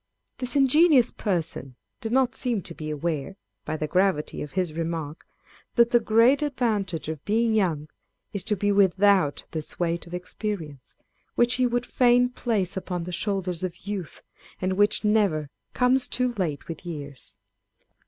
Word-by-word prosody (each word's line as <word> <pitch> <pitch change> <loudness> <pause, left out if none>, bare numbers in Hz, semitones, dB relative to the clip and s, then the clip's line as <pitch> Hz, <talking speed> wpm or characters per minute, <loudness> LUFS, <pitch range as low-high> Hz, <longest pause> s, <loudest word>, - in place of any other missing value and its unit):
This 250 +2 0
ingenious 280 -1 +5
person 165 - -3 0.2
did 225 - -4
not 260 0 +3
seem 235 -7 -2
to 170 - -8
be 155 -1 -6
aware, 155 +3 -3 0.3
by 155 +1 -3
the 155 - -2
gravity 180 -1 0
of 150 - -7
his 180 -4 -1
remark, 165 -2 -4 0.5
that 235 -1 +4
the 240 - +6
great 230 +5 +4
advantage 220 - -1
of 155 -2 -5
being 225 +2 +1
young 170 -8 +1 0.5
is 200 -3 -2
to 210 - +1
be 205 +1 +1
without 195 -5 +3
this 155 -2 -6
weight 170 0 -1
of 170 - -11
experience, 180 - -5 0.4
which 240 +1 +3
he 250 - +4
would 245 0 -1
fain 245 0 +4
place 215 -7 -1
upon 180 -2 -3
the 180 - -6
shoulders 185 -2 -1
of 180 0 -5
youth, 200 -6 -5 0.4
and 185 0 0
which 205 +3 +2
never 195 -9 +2 0.2
comes 255 +1 +3
too 250 -1 0
late 165 -10 -3
with 165 0 -7
years. 145 -6 -7
195 Hz, 160 wpm, -25 LUFS, 165-235 Hz, 0.5 s, the